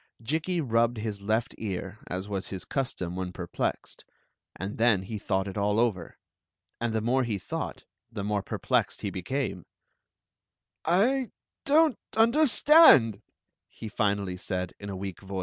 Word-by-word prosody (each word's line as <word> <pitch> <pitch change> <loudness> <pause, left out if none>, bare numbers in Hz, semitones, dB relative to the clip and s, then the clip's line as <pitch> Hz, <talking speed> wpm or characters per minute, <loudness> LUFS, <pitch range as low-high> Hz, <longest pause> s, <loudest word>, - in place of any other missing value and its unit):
Jikki 160 +9 -1
rubbed 115 -2 +1
his 105 -2 -4
left 110 +3 0
ear, 100 0 -5
as 95 +2 -4
was 100 -2 -3
his 95 -2 -6
custom 110 -10 -3
when 90 -1 -3
perplexed; 90 -1 -4 0.5
"and, 95 +5 -6
then 110 -5 +4
he 105 +2 -5
thought 95 -1 -1
it 100 +1 -4
all 105 +2 +1
over. 105 -8 -1 0.6
And 120 -1 -1
the 110 0 0
more 130 +4 +2
he 110 -4 -1
^ught 95 - -5 0.3
the 105 -3 -5
more 105 0 0
periled - - -1
he - - -3
heatme.! 95 - -3 1.2
dcm't 265 - +2 0.2
understandr 235 - +6 0.5
he 110 - -9
finally 100 -3 -1
said, 90 -1 -3
in 100 - -7
a 100 - -4
weak 95 -2 -6
voice. 95 -1 -5
105 Hz, 145 wpm, -28 LUFS, 95-130 Hz, 1.2 s, understandr